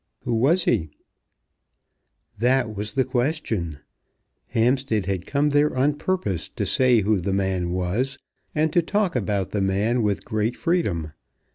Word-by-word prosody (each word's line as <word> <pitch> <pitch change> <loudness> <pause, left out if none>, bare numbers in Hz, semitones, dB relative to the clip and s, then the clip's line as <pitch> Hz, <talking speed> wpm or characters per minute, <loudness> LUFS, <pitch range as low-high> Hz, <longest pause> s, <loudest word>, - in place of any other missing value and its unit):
"Who 120 - -1
was 145 +11 +3
he?" 80 - +1 1.5
That 125 -2 +2
was 105 +1 -3
the 135 - +3
question. 120 - -1 0.7
Hampstead 120 -3 +1
had 95 -2 -3
come 145 +1 +1
there 145 -1 +2
on 140 +3 +3
purpose 145 - -2
to - - -3
say 125 -3 +4
who 105 0 +2
the 95 +2 -2
man 95 -2 0
was, 95 +10 -1 0.4
and 155 0 +1
to 175 - +4
talk 195 0 0
about 100 -5 -1
the 105 - -1
man 100 +5 +1
with 105 -2 -1
great 110 +2 -1
freedom. 100 - -1
115 Hz, 145 wpm, -24 LUFS, 95-140 Hz, 1.5 s, say